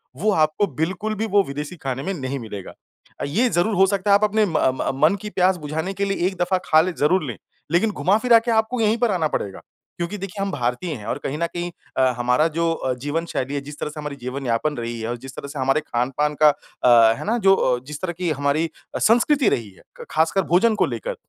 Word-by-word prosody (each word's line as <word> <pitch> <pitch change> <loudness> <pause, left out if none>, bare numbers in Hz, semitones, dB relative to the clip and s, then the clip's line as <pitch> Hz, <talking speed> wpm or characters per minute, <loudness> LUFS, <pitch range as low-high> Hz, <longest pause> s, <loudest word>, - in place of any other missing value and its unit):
वो 210 +10 +1
आपको 155 +4 +2
बिल्कुल 195 +6 -1
भी 215 +2 -2
वो 200 - +6
विदेशी 145 +4 -5
खाने 135 0 -3
में 195 - -2
नहीं 140 -4 -4
मिलेगा। 105 -5 -8 0.5
अ, - - -4
ये 230 - +2
ज़रूर 175 +5 +1
हो 190 0 +5
सकता 200 +1 0
है - - +8
आप 210 - -4
अपने 215 0 +3
म 175 - -1
म 130 0 +1
मन 160 +6 +5
की 210 - -5
प्यास 185 -1 +2
बुझाने 160 +5 -4
के 200 +1 -1
लिए 195 -2 0
एक 190 - -3
दफ़ा 185 +1 +2
खा 155 0 +5
लें 180 +1 -2
ज़रूर 175 +4 +2
ले। - - -10 0.3
लेकिन 210 +6 +2
घुमा-फिरा 225 +5 +4
के 235 +1 -2
आपको 220 +2 +1
यहीं 220 +2 +2
पर 235 -2 +1
आना 170 -4 +1
पड़ेगा। 100 -9 -4 0.4
क्योंकि 175 +4 -3
देखिए 195 +1 -6
हम 195 - -1
भारतीय 130 +4 -2
हैं 105 -3 -9
और - - -2
कहीं 145 +3 -3
न 170 - 0
कहीं 175 0 -3 0.3
अ, - - +3 0.2
हमारा 125 +6 +2
जो 165 0 +2
अ, 130 -5 -2
जीवन 145 +5 -2
शैली 135 -4 -3
है 140 - -2
जिस 145 +1 -10
तरह - - -3
से 150 0 -9
हमारी 150 -1 -5
जीवन 130 +1 -6
यापन 120 +6 0
रही 115 0 -4
है 110 - -3
और 120 - -3
जिस 130 +1 -11
तरह 140 - -7
से 140 -1 -7
हमारे 135 +3 +2
खान-पान 135 +3 -1
का 150 - +9
अ, 120 -5 +3
है - - -6
ना? 230 +3 +1
जो 195 -3 +5
अ, 125 -6 +1
जिस 150 +1 -8
तरह 185 -2 -2
की 180 -2 -1
हमारी 145 +2 +1 0.3
अ, - - -1
संस्कृति 245 +3 +4
रही 115 -4 -2
है। 95 - -21 0.2
क - - -8
खासकर 165 +5 +2
भोजन 215 +6 +4
को - - +2
लेकर, - - -4
165 Hz, 250 wpm, -22 LUFS, 135-195 Hz, 0.5 s, का